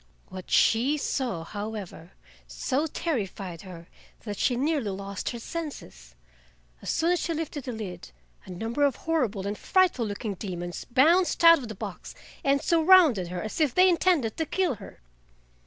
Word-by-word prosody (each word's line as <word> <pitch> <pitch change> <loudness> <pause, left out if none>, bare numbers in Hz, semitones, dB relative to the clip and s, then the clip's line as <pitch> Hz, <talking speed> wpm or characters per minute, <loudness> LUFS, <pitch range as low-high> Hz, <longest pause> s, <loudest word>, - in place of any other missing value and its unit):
What 185 -1 -9
she 255 +7 +3
saw, 250 - -2
however, 205 -3 -7 0.3
so 285 +4 -1
terrified 195 - -4
her 170 -3 -11 0.3
that 205 -3 -6
she 250 - +2
nearly 280 -3 0
lost 195 0 -4
her 240 - -5
senses. 230 - -8 0.7
As - - -6
soon 335 +2 +1
as 355 - +2
she 335 - -2
lifted 300 -3 -5
the 255 - -3
lid, 210 - -7 0.4
a - - -13
number 225 +9 -4
of 280 -3 +3
horrible 245 -12 -1
and 205 +1 -2
frightful 350 - +2
looking 205 +1 -4
demons 175 -2 -6
bounced 335 +9 +3
out 335 -1 +9
of 250 - -7
the 220 - -7
box - - -8 0.3
and 280 0 +2
surrounded 325 - +5
her 180 0 -5
as 215 +8 -4
if 290 -5 +2
they 370 +1 +6
intended 340 -10 +2
to 320 - 0
kill 365 -2 0
her. - - -12
240 Hz, 165 wpm, -27 LUFS, 195-320 Hz, 0.7 s, out